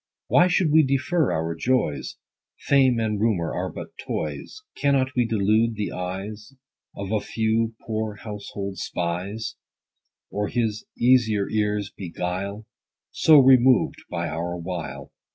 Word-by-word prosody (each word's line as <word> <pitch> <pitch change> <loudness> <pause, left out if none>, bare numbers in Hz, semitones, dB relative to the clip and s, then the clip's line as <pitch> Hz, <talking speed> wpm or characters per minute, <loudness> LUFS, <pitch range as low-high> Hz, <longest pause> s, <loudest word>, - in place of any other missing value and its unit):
Why 175 - +5
should 180 -3 +2
we 160 +1 +7
defer 140 +3 +1
our 80 +1 -1
joys? 100 - -1 0.5
Fame 130 -4 +3
and 105 -2 -1
rumor 95 -8 +1
are - - -3
but - - -8
toys. 75 - -5
10 140 -1 +2
Cannot 130 0 0
we 120 -2 +2
delude 110 +1 +2
the 105 -1 -3
eyes 100 +5 -6 0.4
Of 100 0 -5
a 110 - +2
few 110 +1 0
poor 110 -1 -2
household 100 -2 -6
spies; 95 +7 -3 0.7
Or 105 0 -1
his 110 -3 -1
easier 115 -5 +3
ears 105 -2 -1
buguile, 95 +3 -4 0.5
So 155 -1 +6
removed 130 -2 +5
by - - -2
our 85 +2 -3
wile 85 -1 -6
110 Hz, 135 wpm, -24 LUFS, 95-125 Hz, 0.7 s, we